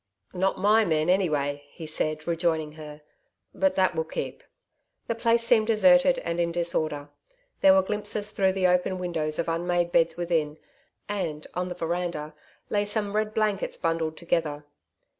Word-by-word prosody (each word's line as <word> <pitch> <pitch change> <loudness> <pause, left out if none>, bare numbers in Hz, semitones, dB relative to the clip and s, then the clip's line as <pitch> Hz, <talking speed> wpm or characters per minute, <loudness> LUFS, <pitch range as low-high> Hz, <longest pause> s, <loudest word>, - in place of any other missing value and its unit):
'Not 190 +1 0
my 210 +3 +4
men, 160 -2 +1
anyway,' 145 -6 0
he 160 - -10
said, 155 0 -3
rejoining 165 -2 0
her. 150 -1 -11 0.5
'But 285 - +1
that 185 -1 +2
will 160 -1 -1
keep.' 160 - -6 0.6
The - - -1
place 230 0 +2
seemed 230 -2 +3
deserted 270 +4 +5
and 170 0 -2
in 170 0 +1
disorder. 155 -4 -1 0.5
There 190 0 +6
were 190 - +4
glimpses 210 +1 -1
through 190 -2 +1
the 190 -1 0
open 180 +1 +2
windows 160 -4 -2
of 170 - -1
unmade 175 +1 0
beds 165 -1 +2
within, 165 -3 -1 0.5
and, 170 -7 -3
on 180 0 -2
the 180 - -5
veranda, 170 -3 -3 0.4
lay 205 -1 +2
some 205 0 -2
red 215 0 -1
blankets 215 -3 0
bundled 165 -2 -1
together. 155 -4 -2
175 Hz, 160 wpm, -26 LUFS, 160-205 Hz, 0.6 s, There